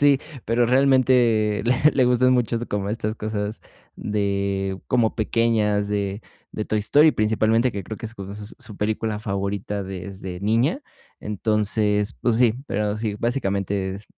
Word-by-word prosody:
sí, 145 -2 +5 0.3
pero 115 +2 +2
realmente 125 -5 +3
le 130 +5 +4
le 130 - +3
gustan 125 +1 +4
mucho 120 -2 +1
como 100 -1 -2
estas 110 0 -2
cosas 105 0 -4 0.4
de 100 -2 -1
como 120 -3 +1
pequeñas, 110 -2 +1
de 100 0 -2 0.3
de 110 - -3
Toy 110 - -1
Story, 145 +9 +5
principalmente 110 +2 +2
que 100 -1 -4
creo 110 +4 -7
que 115 - -5
es 110 - -9
su 100 +2 -8
su 105 - -12
película 110 0 -1
favorita 100 -1 -3
desde 95 -1 -7
niña. 115 - +1 0.4
Entonces, 105 0 0
pues 120 -2 +1
sí, 120 -2 +4
pero 105 0 -1
sí, 105 -2 -3
básicamente 100 -5 -1
es 100 +2 -10
105 Hz, 150 wpm, -23 LUFS, 100-115 Hz, 0.4 s, sí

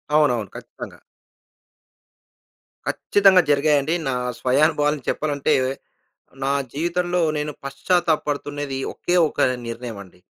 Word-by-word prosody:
అవునవును. 120 -10 +2
ఖచ్చితంగా. - - -9 1.9
ఖచ్చితంగా 195 -2 +4
జరిగాయండి. 145 +1 +2
నా 135 - 0 0.3
స్వయానుభవాలు 150 +3 +2
చెప్పాలంటే, 145 -2 0 0.9
నా 135 - +1 0.2
జీవితంలో 175 +3 -1 0.2
నేను 150 0 -2
పశ్చాత్తాప 160 +4 +1
పడుతున్నది 145 -1 -3
ఒకే 175 - -2
ఒక - - -6 0.3
నిర్ణయమండి. 115 -6 -8
145 Hz, 85 wpm, -22 LUFS, 135-160 Hz, 1.9 s, ఖచ్చితంగా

